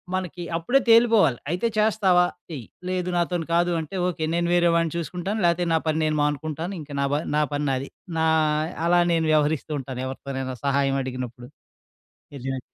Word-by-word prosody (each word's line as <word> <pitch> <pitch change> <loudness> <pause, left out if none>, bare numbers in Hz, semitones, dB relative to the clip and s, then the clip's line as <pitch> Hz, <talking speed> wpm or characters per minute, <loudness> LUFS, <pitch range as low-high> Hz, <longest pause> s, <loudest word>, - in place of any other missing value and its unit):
మనకి 180 -1 -4
అప్పుడే 245 +12 +2
తేలిపోవాలి. 225 - +5
అయితే, 180 +8 0
చేస్తావా? 205 -4 +4 0.3
చెయ్యి. 140 -9 -7 0.2
లేదు 180 -1 -1
నాతోని 175 -1 0
కాదు 175 +1 +3
అంటే 160 +4 -6
ఓకె. 165 -3 -2
నేను 170 0 +1
వేరే 175 -1 +4
వాడిని 165 -2 +1
చూసుకుంటాను. 180 +6 -3
లేతే 170 +1 +2
నా - - +4
పని 155 0 +1
నేను 155 0 0
మానుకుంటాను 155 +5 -2
ఇంక 150 0 -11
నాబ 140 0 0 0.2
నా 150 - +3
పని 145 0 -1
నాది. 135 +1 -2 0.3
నా 160 - +2 0.6
అలా 175 +1 +4
నేను 165 -1 +1
వ్యవహరిస్తూ 155 0 +1
ఉంటాను 130 -1 -6
ఎవరితోనైనా 130 -1 -5
సహాయమడిగినప్పుడు. 130 -3 -1 0.9
నిజమే. 135 0 -4
160 Hz, 155 wpm, -24 LUFS, 140-175 Hz, 0.9 s, తేలిపోవాలి